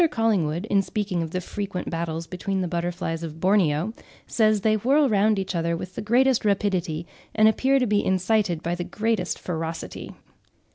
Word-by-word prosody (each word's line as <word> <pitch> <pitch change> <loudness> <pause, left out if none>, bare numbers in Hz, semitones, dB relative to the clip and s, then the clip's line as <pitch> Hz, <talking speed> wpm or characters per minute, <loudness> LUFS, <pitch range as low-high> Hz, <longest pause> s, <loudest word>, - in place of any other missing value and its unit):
Collingwood, 205 - 0
in 200 -3 +2
speaking 195 -3 -2
of 165 - -3
the 185 - -2
frequent 190 0 -5
battles 165 -1 -3
between 190 +2 -3
the 180 - -1
butterflies 170 -1 -3
of 160 -1 -7
Borneo, 185 0 +2 0.3
says, 215 -2 +2
"They 215 +2 +3
whirl 275 +7 +3
round 215 -1 +3
each 190 -1 -2
other 170 -1 0
with 185 +2 -7
the - - -5
greatest 250 +3 +3
rapidity, 190 -5 0 0.3
and 215 0 +6
appear 265 +5 +3
to 255 - +2
be 205 -2 +1
incited 190 -2 +1
by 170 - -1
the 175 0 -3
greatest 215 -2 -1
ferocity." 165 -2 -5
190 Hz, 175 wpm, -24 LUFS, 170-215 Hz, 0.3 s, and